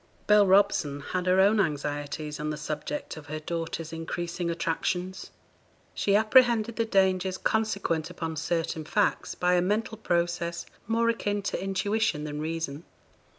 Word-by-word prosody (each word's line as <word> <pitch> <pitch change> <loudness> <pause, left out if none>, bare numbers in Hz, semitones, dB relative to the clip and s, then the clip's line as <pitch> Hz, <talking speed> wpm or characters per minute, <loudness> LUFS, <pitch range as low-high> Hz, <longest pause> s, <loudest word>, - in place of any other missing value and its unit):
Bell 210 -1 +6
Robson 190 -7 +3
had 185 +4 -3
her 185 +1 +4
own 205 +3 +5
anxieties 150 -2 -2
on 150 0 -2
the 150 - -3
subject 150 0 -4
of 155 -1 -10
her 155 +1 -4
daughter's 165 0 -4
increasing 170 +1 -3
attractions. 180 +3 -2 0.6
She 200 - +1
apprehended 230 0 +4
the 230 - +1
dangers 190 -3 +2
consequent 200 -7 0
upon 165 -2 -5
certain 165 0 -1
facts, 155 - 0
by 180 0 +2
a 180 - +4
mental 215 +4 -1
process 170 -3 -1 0.2
more 230 +1 +2
akin 205 -3 -1
to 195 - -2
intuition 195 -3 0
than 150 0 -4
reason. 160 -1 -3
175 Hz, 145 wpm, -27 LUFS, 155-205 Hz, 0.6 s, Bell